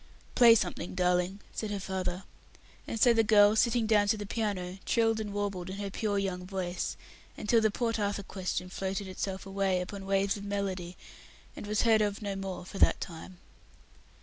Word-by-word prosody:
"Play 235 Hz, -2 st, +8 dB
something, 180 Hz, -3 st, -2 dB
darling," 180 Hz, +2 st, +1 dB
said 215 Hz, -, -3 dB
her 205 Hz, -1 st, -3 dB
father; 190 Hz, -1 st, -3 dB, 0.6 s
and 225 Hz, -, -3 dB
so 240 Hz, +2 st, +6 dB
the 225 Hz, -, +4 dB
girl, 210 Hz, -1 st, +6 dB
sitting 235 Hz, 0 st, +2 dB
down 210 Hz, -2 st, +3 dB
to 220 Hz, +1 st, +2 dB
the 205 Hz, -, -5 dB
piano, 195 Hz, -4 st, -3 dB
trilled 225 Hz, -1 st, +2 dB
and 210 Hz, -2 st, -4 dB
warbled 200 Hz, -3 st, -3 dB
in 190 Hz, -, -5 dB
her 200 Hz, -1 st, -4 dB
pure 205 Hz, 0 st, -1 dB
young 190 Hz, -2 st, -2 dB
voice, 180 Hz, -1 st, -3 dB, 0.4 s
until 225 Hz, +2 st, +2 dB
the 220 Hz, -, +3 dB
Port 230 Hz, +1 st, -1 dB
Arthur 200 Hz, -1 st, -1 dB
question 185 Hz, -2 st, -3 dB
floated 195 Hz, +2 st, -3 dB
itself 190 Hz, +1 st, -4 dB
away 195 Hz, -1 st, 0 dB
upon 195 Hz, +2 st, -6 dB
waves 195 Hz, +1 st, +1 dB
of 200 Hz, -, -8 dB
melody, 190 Hz, -3 st, -3 dB, 0.6 s
and -, -, -8 dB
was 210 Hz, 0 st, +1 dB
heard 225 Hz, -2 st, +5 dB
of 205 Hz, 0 st, 0 dB
no 200 Hz, -2 st, -4 dB
more 195 Hz, -2 st, -5 dB
for 195 Hz, -, -8 dB
that -, -, +5 dB
time. 175 Hz, +1 st, -8 dB
200 Hz, 185 wpm, -30 LUFS, 185-210 Hz, 0.6 s, Play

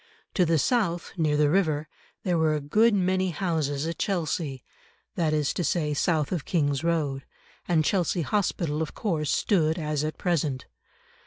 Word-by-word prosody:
To 180 Hz, -, +3 dB
the 165 Hz, 0 st, +3 dB
south, 175 Hz, -, 0 dB
near 155 Hz, -4 st, +1 dB
the 150 Hz, 0 st, +4 dB
river, 155 Hz, -5 st, +1 dB, 0.4 s
there 180 Hz, -5 st, +1 dB
were 160 Hz, -2 st, +2 dB
a -, -, -1 dB
good 210 Hz, +10 st, +3 dB
many 185 Hz, 0 st, +1 dB
houses 155 Hz, -5 st, -1 dB
at 165 Hz, 0 st, -4 dB
Chelsea, 160 Hz, -, -2 dB, 0.5 s
that 160 Hz, -3 st, 0 dB
is 150 Hz, -3 st, +1 dB
to 180 Hz, -, -2 dB
say 150 Hz, -1 st, 0 dB
south 155 Hz, 0 st, +1 dB
of 175 Hz, -6 st, -1 dB
King's 145 Hz, -4 st, 0 dB
Road, 150 Hz, -5 st, 0 dB, 0.4 s
and 160 Hz, -3 st, +2 dB
Chelsea 175 Hz, -2 st, +1 dB
Hospital 165 Hz, -4 st, -1 dB
of 160 Hz, -, -4 dB
course 160 Hz, -, -1 dB
stood 160 Hz, -6 st, +2 dB
as 150 Hz, -2 st, -1 dB
at 155 Hz, 0 st, -3 dB
present. 150 Hz, -7 st, -1 dB
160 Hz, 165 wpm, -26 LUFS, 150-180 Hz, 0.5 s, the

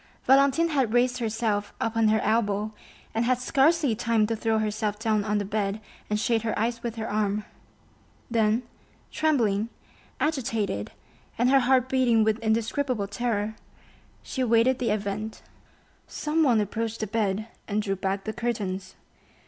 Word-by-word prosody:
Valentine 275 Hz, +5 st, +4 dB
had 265 Hz, -7 st, +1 dB
raised 245 Hz, +1 st, +2 dB
herself 220 Hz, -2 st, -1 dB
upon 225 Hz, -1 st, +1 dB
her 220 Hz, 0 st, +3 dB
elbow, 215 Hz, -1 st, +1 dB, 0.4 s
and 225 Hz, -, +1 dB
had 250 Hz, +1 st, +2 dB
scarcely 280 Hz, +2 st, +3 dB
time 225 Hz, -1 st, +1 dB
to 225 Hz, +1 st, -1 dB
throw 225 Hz, 0 st, 0 dB
herself 215 Hz, -1 st, -1 dB
down 215 Hz, -1 st, +1 dB
on 210 Hz, 0 st, 0 dB
the 205 Hz, -, -1 dB
bed 200 Hz, 0 st, -1 dB, 0.3 s
and 210 Hz, 0 st, 0 dB
shade 225 Hz, 0 st, +1 dB
her 220 Hz, 0 st, -2 dB
eyes 230 Hz, +2 st, -1 dB
with 235 Hz, -1 st, -4 dB
her 225 Hz, -1 st, -4 dB
arm; 210 Hz, 0 st, -1 dB, 0.8 s
then, 225 Hz, 0 st, +2 dB, 0.5 s
trembling, 230 Hz, -9 st, +1 dB, 0.5 s
agitated, 225 Hz, -, -1 dB, 0.5 s
and 245 Hz, +2 st, +3 dB
her 275 Hz, -, +6 dB
heart 255 Hz, 0 st, +3 dB
beating 250 Hz, -4 st, +3 dB
with 220 Hz, 0 st, +1 dB
indescribable 225 Hz, 0 st, 0 dB
terror, 220 Hz, 0 st, -2 dB, 0.7 s
she 260 Hz, -, -4 dB
awaited 240 Hz, +1 st, +3 dB
the 245 Hz, -, 0 dB
event. 210 Hz, +1 st, -3 dB, 0.6 s
Someone 300 Hz, -6 st, +2 dB
approached 225 Hz, +2 st, -2 dB
the -, -, 0 dB
bed 215 Hz, -1 st, -1 dB, 0.2 s
and 210 Hz, 0 st, 0 dB
drew 195 Hz, -2 st, -1 dB
back 195 Hz, +1 st, -2 dB
the 220 Hz, -, -4 dB
curtains. 205 Hz, -5 st, -3 dB
225 Hz, 150 wpm, -26 LUFS, 210-245 Hz, 0.8 s, her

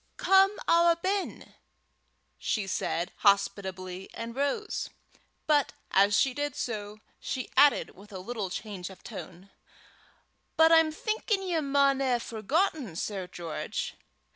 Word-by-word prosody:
"Come 390 Hz, +1 st, +4 dB
awa 340 Hz, 0 st, +5 dB
ben," 385 Hz, +2 st, -3 dB, 0.9 s
she 210 Hz, -3 st, -1 dB
said, 180 Hz, -1 st, -2 dB
hospitably, 190 Hz, -2 st, 0 dB
and 230 Hz, +1 st, -6 dB
rose. 285 Hz, -, -2 dB, 0.6 s
But 295 Hz, -3 st, +2 dB, 0.2 s
as 200 Hz, +1 st, +4 dB
she 265 Hz, +4 st, +2 dB
did 290 Hz, 0 st, -3 dB
so, 210 Hz, -2 st, -5 dB, 0.2 s
she 255 Hz, -, -4 dB
added 290 Hz, -1 st, +5 dB
with 205 Hz, +3 st, -15 dB
a 190 Hz, -, -6 dB
little 200 Hz, +1 st, -4 dB
change 195 Hz, -2 st, -6 dB
of 190 Hz, -, -14 dB
tone, 190 Hz, -3 st, -9 dB, 1.1 s
"But 320 Hz, +1 st, +6 dB
I'm 325 Hz, -1 st, +6 dB
thinkin' 430 Hz, +3 st, -1 dB
ye 350 Hz, -3 st, 0 dB
maun 280 Hz, -2 st, +3 dB
hae 260 Hz, -3 st, +2 dB
forgotten, 240 Hz, -, -1 dB
Sir 190 Hz, +1 st, -3 dB
George. 170 Hz, -3 st, -4 dB
240 Hz, 125 wpm, -29 LUFS, 195-315 Hz, 1.1 s, But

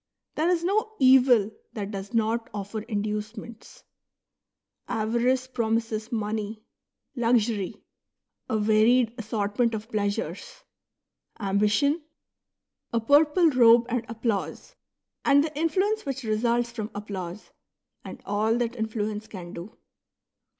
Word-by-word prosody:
There 320 Hz, +3 st, +1 dB
is 345 Hz, -2 st, +1 dB
no 430 Hz, +4 st, 0 dB
evil 255 Hz, -5 st, +5 dB, 0.2 s
that 205 Hz, -3 st, -5 dB
does 195 Hz, 0 st, -6 dB
not 230 Hz, 0 st, 0 dB
offer 205 Hz, +2 st, -4 dB
inducements. 215 Hz, +1 st, -5 dB, 1.0 s
Avarice 240 Hz, +4 st, +1 dB
promises 225 Hz, -2 st, -2 dB
money; 215 Hz, -1 st, -3 dB, 0.5 s
luxury, 230 Hz, -5 st, 0 dB, 0.7 s
a 220 Hz, -, +1 dB
varied 220 Hz, +3 st, +3 dB
assortment 220 Hz, +1 st, 0 dB
of 220 Hz, +2 st, -7 dB
pleasures; 210 Hz, -, -3 dB, 0.8 s
ambition, 210 Hz, -, +2 dB, 0.9 s
a 235 Hz, -, +1 dB
purple 300 Hz, +7 st, +4 dB
robe 235 Hz, -2 st, +6 dB
and 245 Hz, -1 st, -1 dB
applause, 225 Hz, -3 st, -3 dB, 0.5 s
and 285 Hz, 0 st, +5 dB
the 310 Hz, -1 st, -5 dB
influence 380 Hz, +8 st, 0 dB
which 275 Hz, -2 st, -4 dB
results 235 Hz, +2 st, 0 dB
from 220 Hz, -3 st, -5 dB
applause, 200 Hz, -2 st, -6 dB, 0.5 s
and -, -, -10 dB
all 215 Hz, +3 st, +1 dB
that 240 Hz, 0 st, -1 dB
influence 220 Hz, -2 st, -3 dB
can 175 Hz, -3 st, -9 dB
do. 175 Hz, +6 st, -9 dB
225 Hz, 110 wpm, -26 LUFS, 210-250 Hz, 1.0 s, robe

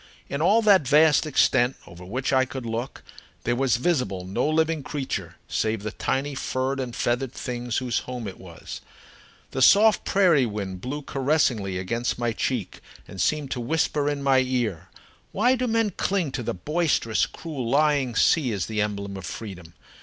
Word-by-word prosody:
In 140 Hz, -, -3 dB
all 215 Hz, +7 st, +4 dB
that 195 Hz, -9 st, +5 dB
vast 155 Hz, +2 st, +5 dB
extent 125 Hz, -3 st, +3 dB
over 85 Hz, +1 st, -12 dB
which 125 Hz, +9 st, -2 dB
I 130 Hz, 0 st, +5 dB
could 130 Hz, -1 st, -6 dB
look, 115 Hz, +4 st, -4 dB, 0.4 s
there 120 Hz, -, 0 dB
was 130 Hz, -2 st, +2 dB
visible 125 Hz, -, -1 dB
no 115 Hz, +10 st, -1 dB
living 160 Hz, 0 st, +1 dB
creature 140 Hz, 0 st, -4 dB
save 110 Hz, -2 st, -1 dB
the 110 Hz, -, -3 dB
tiny 140 Hz, +6 st, -2 dB
furred 135 Hz, 0 st, -2 dB
and 125 Hz, -2 st, -4 dB
feathered 120 Hz, +2 st, -1 dB
things 120 Hz, -2 st, -4 dB
whose 125 Hz, -2 st, 0 dB
home 125 Hz, -3 st, -6 dB
it 95 Hz, -, -8 dB
was. 85 Hz, -3 st, -9 dB, 0.7 s
The 130 Hz, -, -3 dB
soft 210 Hz, -, +6 dB
prairie 170 Hz, -10 st, +3 dB
wind 100 Hz, -4 st, -5 dB
blew 145 Hz, +6 st, -4 dB
caressingly 130 Hz, -10 st, 0 dB
against 115 Hz, +6 st, -2 dB
my 120 Hz, -1 st, 0 dB
cheek -, -, -3 dB, 0.3 s
and 95 Hz, -, -6 dB
seemed 150 Hz, -3 st, 0 dB
to 125 Hz, -, -2 dB
whisper 145 Hz, +2 st, 0 dB
in 145 Hz, -1 st, -3 dB
my 135 Hz, -1 st, +4 dB
ear: 120 Hz, -10 st, -1 dB, 0.4 s
"Why 240 Hz, +6 st, +3 dB
do 250 Hz, 0 st, -1 dB
men 225 Hz, -2 st, +1 dB
cling 185 Hz, -4 st, -1 dB
to 130 Hz, -, -3 dB
the 115 Hz, -, -3 dB
boisterous, 150 Hz, -, 0 dB
cruel, 140 Hz, -8 st, -6 dB
lying 140 Hz, -3 st, +2 dB
sea 135 Hz, -1 st, +3 dB
as 100 Hz, -3 st, -2 dB
the 110 Hz, -1 st, -2 dB
emblem 100 Hz, -1 st, -3 dB
of 95 Hz, -, -8 dB
freedom? 90 Hz, -6 st, -8 dB
130 Hz, 175 wpm, -25 LUFS, 110-150 Hz, 0.7 s, soft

